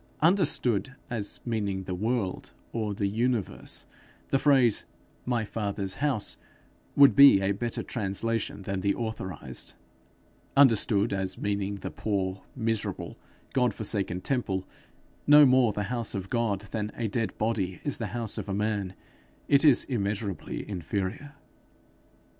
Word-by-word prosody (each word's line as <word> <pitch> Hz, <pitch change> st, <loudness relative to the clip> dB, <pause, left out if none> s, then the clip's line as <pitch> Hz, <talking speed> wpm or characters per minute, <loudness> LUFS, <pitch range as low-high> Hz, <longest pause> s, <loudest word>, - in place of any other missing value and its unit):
Understood 140 Hz, -, +2 dB, 0.2 s
as 110 Hz, -4 st, -2 dB
meaning 100 Hz, -5 st, -2 dB
the 90 Hz, -, -4 dB
world, 105 Hz, 0 st, -2 dB, 0.2 s
or 110 Hz, -3 st, -2 dB
the 100 Hz, -, -1 dB
universe, 115 Hz, +1 st, -1 dB, 0.4 s
the 135 Hz, -, +2 dB
phrase, 130 Hz, -7 st, +4 dB, 0.4 s
'my 120 Hz, -3 st, 0 dB
father's 100 Hz, -2 st, -3 dB
house,' 140 Hz, -8 st, -1 dB, 0.6 s
would 140 Hz, -1 st, +7 dB
be 140 Hz, -7 st, +9 dB
a 95 Hz, 0 st, +1 dB
better 115 Hz, +4 st, -3 dB
translation 115 Hz, -1 st, -2 dB
than 95 Hz, 0 st, -3 dB
the 100 Hz, +1 st, +1 dB
authorized; 95 Hz, -, -4 dB, 0.8 s
understood 110 Hz, -7 st, +5 dB
as 95 Hz, -1 st, -2 dB
meaning 100 Hz, 0 st, -2 dB
the 100 Hz, -, -6 dB
poor, 95 Hz, -3 st, -2 dB
miserable, 115 Hz, -4 st, -2 dB, 0.4 s
God 125 Hz, -5 st, +2 dB
forsaken 100 Hz, -4 st, -1 dB
temple 95 Hz, -8 st, -1 dB, 0.6 s
no 150 Hz, 0 st, +9 dB
more 130 Hz, -3 st, +5 dB
the 105 Hz, 0 st, -2 dB
house 115 Hz, -4 st, 0 dB
of 95 Hz, -1 st, -5 dB
God 115 Hz, -5 st, 0 dB
than 105 Hz, -1 st, -2 dB
a 115 Hz, -, -2 dB
dead 115 Hz, +2 st, -2 dB
body 105 Hz, -5 st, -1 dB
is 145 Hz, -, -2 dB
the 115 Hz, -, -2 dB
house 110 Hz, +1 st, -2 dB
of -, -, -6 dB
a 95 Hz, -, -1 dB
man 100 Hz, -2 st, -1 dB, 0.5 s
it 140 Hz, +1 st, +4 dB
is 145 Hz, -5 st, +6 dB
immeasurably 100 Hz, -, -3 dB
inferior. 100 Hz, -, -4 dB
110 Hz, 135 wpm, -28 LUFS, 100-120 Hz, 0.8 s, be